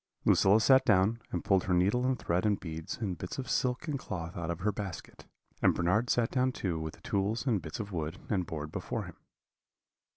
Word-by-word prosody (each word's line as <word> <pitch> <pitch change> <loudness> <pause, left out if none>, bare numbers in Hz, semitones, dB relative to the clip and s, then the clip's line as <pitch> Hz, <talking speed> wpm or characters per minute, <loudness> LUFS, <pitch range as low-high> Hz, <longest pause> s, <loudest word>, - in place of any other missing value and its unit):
Lucilla 100 +3 +5
sat 130 +3 +6
down, 110 +1 +3
and 90 - -2
pulled 95 -3 +3
her 90 - +2
needle 105 +8 +2
and 130 -1 +1
thread 90 -4 0
and 105 -2 +2
beads 80 -2 -6
and 100 -6 -3
bits 90 - -5
of 130 -2 -4
silk 125 +6 0
and 145 -3 -2
cloth 85 -5 -5
out 85 -2 -4
of 85 -1 -3
her 105 +3 +2
basket; 100 -4 -7 0.3
and - - +4
Bernard 105 +8 +1
sat 120 -2 +2
down 130 0 +2
too 90 -9 -2
with 80 0 -5
the - - -22
tools 105 +5 -1
and 110 -8 +1
bits 80 -2 -7
of 105 -1 -5
wood 80 0 -3
and 95 -5 0
board 75 -1 -5
before - - -3
him. - - -10
100 Hz, 220 wpm, -31 LUFS, 85-115 Hz, 0.3 s, sat